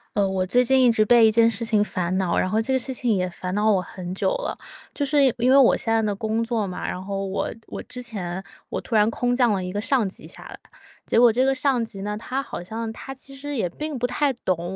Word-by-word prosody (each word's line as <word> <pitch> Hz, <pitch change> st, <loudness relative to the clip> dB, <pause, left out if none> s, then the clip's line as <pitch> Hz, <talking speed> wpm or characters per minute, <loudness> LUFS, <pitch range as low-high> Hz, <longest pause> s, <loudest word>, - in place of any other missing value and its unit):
呃， 200 Hz, -1 st, +2 dB
我 190 Hz, -1 st, -1 dB
最 245 Hz, +7 st, +3 dB
近 265 Hz, +2 st, +4 dB
一 245 Hz, -, +6 dB
直 215 Hz, -1 st, +3 dB
被 235 Hz, +1 st, +6 dB
一 -, -, +3 dB
件 230 Hz, +1 st, +5 dB
事 230 Hz, +1 st, -3 dB
情 220 Hz, -2 st, +2 dB
烦 185 Hz, -3 st, -2 dB
恼， 185 Hz, -3 st, 0 dB
然 185 Hz, -, +1 dB
后 215 Hz, -, +1 dB
这 265 Hz, +4 st, -1 dB
个 260 Hz, -, +2 dB
事 265 Hz, -, -3 dB
情 240 Hz, -4 st, 0 dB
也 180 Hz, -1 st, -1 dB
烦 180 Hz, +1 st, -6 dB
恼 210 Hz, +2 st, +2 dB
我 195 Hz, -, +3 dB
很 180 Hz, 0 st, -7 dB
久 -, -, +1 dB
了。 -, -, -4 dB, 0.4 s
就 285 Hz, -, -1 dB
是 285 Hz, 0 st, +3 dB
因 245 Hz, +2 st, +2 dB
为 -, -, +6 dB
我 270 Hz, -3 st, +6 dB
现 225 Hz, -, -1 dB
在 225 Hz, -, +3 dB
的 210 Hz, -2 st, -1 dB
工 220 Hz, +2 st, -1 dB
作 230 Hz, -2 st, -1 dB
嘛， 185 Hz, -2 st, -5 dB
然 180 Hz, -, -4 dB
后 195 Hz, 0 st, -4 dB
我 190 Hz, -, -2 dB, 0.2 s
我 -, -, -6 dB
之 250 Hz, -, -8 dB
前 190 Hz, -6 st, -5 dB, 0.3 s
我 -, -, -3 dB
突 230 Hz, -, -4 dB
然 210 Hz, 0 st, +5 dB
空 245 Hz, +1 st, 0 dB
降 245 Hz, -3 st, +3 dB
了 195 Hz, -2 st, -1 dB
一 180 Hz, -, -4 dB
个 205 Hz, -, -3 dB
上 235 Hz, 0 st, +1 dB
级 -, -, -10 dB
下 -, -, -10 dB
来， -, -, -11 dB, 0.5 s
结 -, -, +2 dB
果 240 Hz, -1 st, +7 dB
这 250 Hz, +4 st, +2 dB
个 270 Hz, -, +3 dB
上 270 Hz, -4 st, +1 dB
级 210 Hz, -3 st, -9 dB
呢， 210 Hz, +1 st, -3 dB
他 255 Hz, +5 st, -3 dB
好 275 Hz, -, -7 dB
像 220 Hz, +5 st, -5 dB
他 270 Hz, +4 st, -8 dB
其 270 Hz, +1 st, -10 dB
实 290 Hz, +1 st, -5 dB
也 200 Hz, -8 st, -1 dB
并 300 Hz, -, -5 dB
不 245 Hz, -, 0 dB
太 280 Hz, +2 st, 0 dB
懂 185 Hz, -5 st, -3 dB
225 Hz, 295 characters per minute, -23 LUFS, 195-250 Hz, 0.5 s, 果